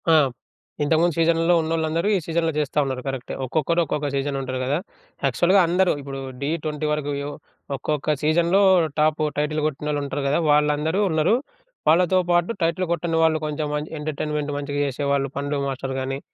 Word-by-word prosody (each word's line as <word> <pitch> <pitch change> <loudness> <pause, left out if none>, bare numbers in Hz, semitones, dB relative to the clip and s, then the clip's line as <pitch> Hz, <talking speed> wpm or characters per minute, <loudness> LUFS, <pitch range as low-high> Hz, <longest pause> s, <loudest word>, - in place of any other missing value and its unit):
ఆ! - - +6 0.7
ఇంతకుముందు 160 +2 +2
సీజన్‌లో 165 +1 +3
ఉన్నోళ్ళందరూ 160 +2 -1
ఈ - - 0
సీజన్‌లో 165 0 0
జేస్తా 150 0 0
ఉన్నారు. 130 -1 -3
కరెక్టే. 135 -2 -4
ఒక్కొక్కరు 160 +5 +1
ఒక్కొక్క 150 0 -2
సీజన్‌లో 140 0 -1
ఉంటారు 130 0 -3
గదా! 135 +3 0 0.5
యాక్చువల్‌గా 175 +9 +3
అందరూ 180 +2 +3
ఇప్పుడు 135 -1 -6 0.2
'ఢీ 140 - -1 0.2
20' 150 0 -2
వరకు 150 -1 -1
యెవ్ 145 +1 -5 0.4
ఒక్కొక్క 150 +2 -1
సీజన్‌లో 170 +5 +3 0.4
టాప్ 155 0 +2 0.2
టైటిల్ 150 +1 0
గొట్టినోళ్ళు 150 0 -2
ఉంటారు 140 0 -3
గదా! 145 +4 +2
వాళ్ళందరూ 150 +5 +2
ఉన్నరు. 160 +6 +3 0.5
వాళ్ళతో 180 +3 +4
పాటు 175 +3 +2
టైటిల్ 170 +2 0
గొట్టని 165 -1 -1
వాళ్ళు 160 -1 +3
కొంచెం 150 0 -2
మంచి 150 +1 -4
ఎంటర్టైన్మెంట్ 150 0 -3
మంచిగా 145 0 -3
జేసేవాళ్ళు 140 0 -1
పండు 140 0 -2
మాస్టర్ 135 0 -4
గానీ 135 +1 -3
150 Hz, 160 wpm, -23 LUFS, 140-165 Hz, 0.7 s, ఆ